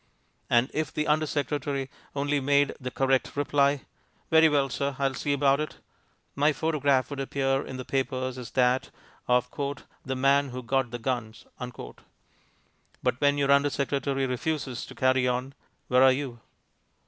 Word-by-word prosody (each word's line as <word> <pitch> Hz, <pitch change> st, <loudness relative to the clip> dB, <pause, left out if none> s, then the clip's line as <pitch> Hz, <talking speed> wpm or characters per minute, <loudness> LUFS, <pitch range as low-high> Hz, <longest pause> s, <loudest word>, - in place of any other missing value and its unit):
And 120 Hz, +3 st, +3 dB
if 155 Hz, 0 st, -1 dB
the 155 Hz, -, -1 dB
undersecretary 145 Hz, -2 st, -1 dB, 0.3 s
only 145 Hz, +1 st, 0 dB
made 140 Hz, +1 st, +2 dB
the 125 Hz, -, -3 dB
correct 135 Hz, 0 st, 0 dB
reply, 140 Hz, -1 st, +2 dB, 0.5 s
"Very 160 Hz, 0 st, +7 dB
well, 140 Hz, -2 st, +2 dB
sir, 140 Hz, +1 st, -2 dB
I'll 135 Hz, -1 st, 0 dB
see 145 Hz, -, -2 dB
about 140 Hz, 0 st, +3 dB
it," 155 Hz, -, -3 dB, 0.6 s
my 150 Hz, +2 st, +3 dB
photograph 140 Hz, -2 st, +1 dB
would 140 Hz, -, -5 dB
appear 135 Hz, 0 st, 0 dB
in 130 Hz, -, -7 dB
the 130 Hz, -, -6 dB
papers 130 Hz, -1 st, -2 dB
as 125 Hz, -, -7 dB
that 125 Hz, 0 st, +2 dB, 0.4 s
of 125 Hz, 0 st, +3 dB, 0.6 s
"the 130 Hz, -, -3 dB
man 140 Hz, +2 st, +3 dB
who 125 Hz, 0 st, -6 dB
got 130 Hz, +1 st, 0 dB
the 120 Hz, -, -5 dB
guns." 115 Hz, -2 st, -4 dB, 1.6 s
But 125 Hz, -, 0 dB
when 145 Hz, 0 st, +3 dB
your 140 Hz, -1 st, +2 dB
under 140 Hz, +1 st, +5 dB
secretary 140 Hz, -1 st, -1 dB
refuses 130 Hz, 0 st, -3 dB
to -, -, -11 dB
carry 130 Hz, 0 st, +2 dB
on, 125 Hz, +2 st, -2 dB, 0.3 s
where 125 Hz, 0 st, +4 dB
are 130 Hz, 0 st, +7 dB
you? 130 Hz, -3 st, -3 dB
135 Hz, 155 wpm, -27 LUFS, 130-145 Hz, 1.6 s, Very